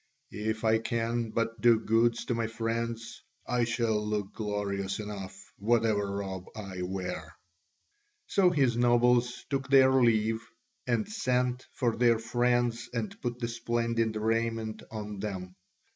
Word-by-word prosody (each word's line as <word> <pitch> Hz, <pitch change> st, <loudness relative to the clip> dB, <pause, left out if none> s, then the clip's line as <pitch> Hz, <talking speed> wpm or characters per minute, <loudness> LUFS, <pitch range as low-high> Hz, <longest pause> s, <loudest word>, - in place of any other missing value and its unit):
If 110 Hz, +1 st, -2 dB
I 110 Hz, 0 st, +4 dB
can 115 Hz, 0 st, -1 dB
but 115 Hz, +1 st, -2 dB
do 120 Hz, -2 st, +6 dB
good 115 Hz, +1 st, +3 dB
to -, -, 0 dB
my 115 Hz, -1 st, -1 dB
friends, 115 Hz, 0 st, -3 dB, 0.2 s
I 120 Hz, -1 st, +1 dB
shall 115 Hz, -2 st, 0 dB
look 105 Hz, -2 st, -2 dB
glorious 100 Hz, -2 st, -2 dB
enough, 100 Hz, -3 st, -6 dB, 0.2 s
whatever 110 Hz, -2 st, +2 dB
robe 95 Hz, -2 st, -4 dB
I 95 Hz, -4 st, -6 dB
wear." 90 Hz, 0 st, -4 dB, 0.9 s
So 190 Hz, -3 st, +4 dB
his 135 Hz, -8 st, +2 dB
nobles 120 Hz, 0 st, +3 dB
took 135 Hz, 0 st, -1 dB
their 135 Hz, -1 st, +7 dB
leave, 115 Hz, -3 st, +3 dB, 0.5 s
and 120 Hz, -3 st, +1 dB
sent 125 Hz, -, 0 dB
for 120 Hz, -3 st, +1 dB
their 120 Hz, -1 st, +4 dB
friends 120 Hz, +1 st, 0 dB
and 115 Hz, -3 st, -3 dB
put 120 Hz, 0 st, -2 dB
the 120 Hz, -1 st, -2 dB
splendid 115 Hz, -1 st, -1 dB
raiment 115 Hz, 0 st, -1 dB
on 105 Hz, -2 st, -6 dB
them. 95 Hz, -3 st, -5 dB
115 Hz, 135 wpm, -29 LUFS, 105-120 Hz, 0.9 s, their